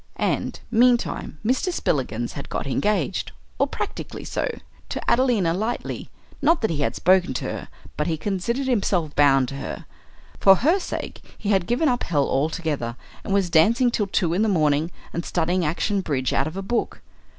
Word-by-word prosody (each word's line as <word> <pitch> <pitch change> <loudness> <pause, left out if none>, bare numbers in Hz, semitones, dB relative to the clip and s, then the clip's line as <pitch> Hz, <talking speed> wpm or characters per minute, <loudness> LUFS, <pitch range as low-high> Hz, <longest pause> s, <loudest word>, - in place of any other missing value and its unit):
And, - - -1
meantime, 240 -7 +2
Mr. 260 - +1
Spillikins 120 - -1
had 140 - -7
got - - -3
engaged, 190 +5 0 0.3
or - - +3
practically - - -5
so, - - -2 0.4
to - - -3
Adelina 235 -10 +3
Lightleigh; 220 +7 -3 0.3
not 320 +4 +3
that 220 - +1
he 160 - -1
had - - 0
spoken 185 -6 +3
to - - -2
her, - - -4 0.3
but 150 - 0
he 160 -2 0
considered 205 - -2
himself 195 - 0
bound 135 -3 +5
to 135 - -6
her. 135 - -6 0.5
For 195 -1 +7
her 320 - +2
sake - - -5 0.2
he 205 - -4
had 190 -4 +2
given 245 +7 +2
up 245 -2 +1
hell 145 -4 +1
altogether, 145 -4 -1 0.3
and - - -5
was 195 -3 +2
dancing 230 +10 +4
till 210 -3 0
two 175 -4 +1
in 185 - +1
the 220 - +3
morning 155 -3 +2 0.2
and 170 - -2
studying 175 +2 0
action 190 +6 0
bridge 135 -7 -1
out - - +1
of 160 +4 -6
a 195 - -3
book. 230 +4 -2
185 Hz, 180 wpm, -23 LUFS, 155-230 Hz, 0.5 s, For